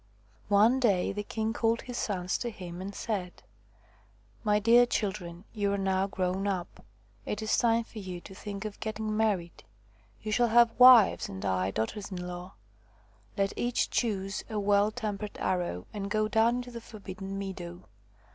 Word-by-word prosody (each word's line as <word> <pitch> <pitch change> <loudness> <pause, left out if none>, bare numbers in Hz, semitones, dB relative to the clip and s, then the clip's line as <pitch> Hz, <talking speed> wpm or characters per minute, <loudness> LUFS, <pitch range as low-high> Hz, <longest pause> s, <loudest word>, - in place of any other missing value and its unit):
One 215 +6 +5
day 200 -8 +2
the 205 - -3
king 220 +2 -2
called 230 0 +1
his 245 - -7
sons 185 -5 -1
to 240 - -2
him 180 -4 -8
and 200 +1 -6
said: 190 - -4 0.5
" 105 +2 -32
My 210 0 +3
dear 235 +3 +6
children, 185 -6 -3
you 205 -3 0
are - - 0
now 190 0 +1
grown 190 0 -1
up. 185 -3 -4 0.4
It 210 +1 -4
is 215 - +2
time 230 -1 +3
for 225 -1 -10
you 185 -3 -6
to 190 - -11
think 200 +1 -7
of 210 -1 -6
getting 215 0 -3
married. 200 -6 0 0.6
You 215 - -5
shall 240 +3 +3
have 235 +1 +4
wives 250 -4 +8
and 95 0 -6
I 95 -1 +1
daughters 115 - -3
in 180 -2 -5
law. 180 +1 -7 0.8
Let 195 0 +1
each 240 0 0
choose 195 -4 -1
a 215 -2 -2
well 205 +1 +3
tempered 210 -2 -5
arrow 175 - -1
and 200 -1 -4
go 215 +2 +1
down 225 +2 +3
into 245 0 -5
the 235 -1 -7
forbidden 195 -3 -7
meadow. 185 -3 -6
200 Hz, 175 wpm, -29 LUFS, 185-220 Hz, 0.8 s, wives